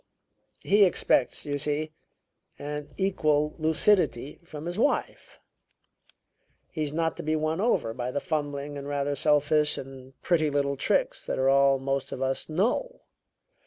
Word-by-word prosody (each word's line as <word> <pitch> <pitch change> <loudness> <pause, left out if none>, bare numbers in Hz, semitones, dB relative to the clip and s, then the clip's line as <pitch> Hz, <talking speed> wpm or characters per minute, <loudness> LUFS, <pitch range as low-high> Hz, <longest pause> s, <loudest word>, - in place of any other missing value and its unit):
He 205 +1 +5
expects, 175 -8 +1
you 145 -1 -2
see, 150 +2 -2 0.7
an 150 0 -6
equal 155 -6 +1
lucidity 155 - +2
from 155 -2 -9
his 175 +4 -4
wife. 285 - -1 1.3
He's 155 -3 -3
not 160 +1 -1
to - - -4
be 155 +1 -1
won 155 +3 -1
over 210 - +1
by 120 +1 -4
the 145 - -2
fumbling 145 -1 -3
and 140 - -8
rather 145 0 -1
selfish 150 +1 +2
and 130 0 -10
pretty 155 -4 +2
little 140 -1 0
tricks - - 0
that - - -2
are 130 0 +2
all 140 0 +4
most 135 0 -2
of - - -5
us 135 +3 -1
know. 245 - -1
150 Hz, 145 wpm, -27 LUFS, 140-160 Hz, 1.3 s, He